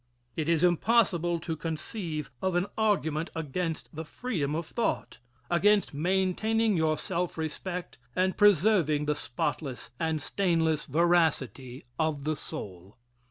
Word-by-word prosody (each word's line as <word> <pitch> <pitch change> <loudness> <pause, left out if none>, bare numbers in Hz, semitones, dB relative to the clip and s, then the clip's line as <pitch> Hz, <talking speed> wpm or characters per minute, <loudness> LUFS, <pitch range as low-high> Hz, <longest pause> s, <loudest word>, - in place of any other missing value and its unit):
It 160 0 -1
is 165 0 +3
impossible 175 -2 +3
to 160 -1 -3
conceive 160 - -4
of 190 -1 0
an 175 +1 +2
argument 170 -8 +1
against 160 +1 -3
the 160 - -4
freedom 155 - -3
of 165 +1 -2
thought 230 +7 -2 0.3
against 200 +4 +3
maintaining 190 +7 +1
your 160 -2 +2
self 175 +3 -2
respect 170 0 -5 0.2
and 185 +1 +2
preserving 185 -7 +4
the 150 - +2
spotless 130 -1 -3
and 160 -1 0
stainless 160 -2 +1
veracity 145 -5 +1
of 155 -3 0
the 155 +1 0
soul. 95 -6 -8
165 Hz, 125 wpm, -29 LUFS, 150-185 Hz, 0.3 s, preserving